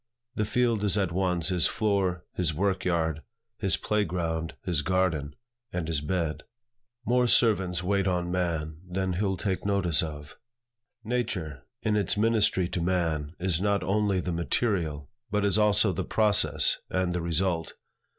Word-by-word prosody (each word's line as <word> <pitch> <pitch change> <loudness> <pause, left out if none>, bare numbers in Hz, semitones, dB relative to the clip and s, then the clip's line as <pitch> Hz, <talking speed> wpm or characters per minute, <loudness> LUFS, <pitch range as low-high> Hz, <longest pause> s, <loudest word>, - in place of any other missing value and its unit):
The 105 -4 -1
field 115 -1 +1
is 105 0 +4
at 95 -4 +1
once 90 -2 +2
his 90 -2 +3
floor, 95 -4 0
his 80 -4 -1
work 95 +2 0
yard, 80 -3 0 0.4
his 95 -6 +2
play 105 0 0
ground, 80 -2 -3
his 85 -5 +1
garden, 85 -5 0 0.4
and 85 -3 -3
his 80 -3 0
bed. 80 0 -2 0.6
"More 125 +1 +3
servants 95 -7 +2
wait 100 +1 +1
on 90 -1 -1
man 80 -4 -2
Than 95 0 -1
he'll 95 +1 -1
take 95 -2 -2
notice 100 -6 +2
of." 75 -2 -7 0.7
Nature, 105 - -3 0.2
in 105 - +1
its 105 -1 0
ministry 105 -4 +2
to 90 - -2
man, 85 -3 -1
is 90 -1 0
not 100 0 +1
only 100 -1 +1
the 90 - -3
material, 85 - -1 0.2
but 105 0 0
is 100 +1 +3
also 105 -1 +3
the - - -2
process 100 -9 +2
and 90 -1 0
the 90 - -1
result. 85 0 -1
90 Hz, 155 wpm, -27 LUFS, 85-100 Hz, 0.7 s, is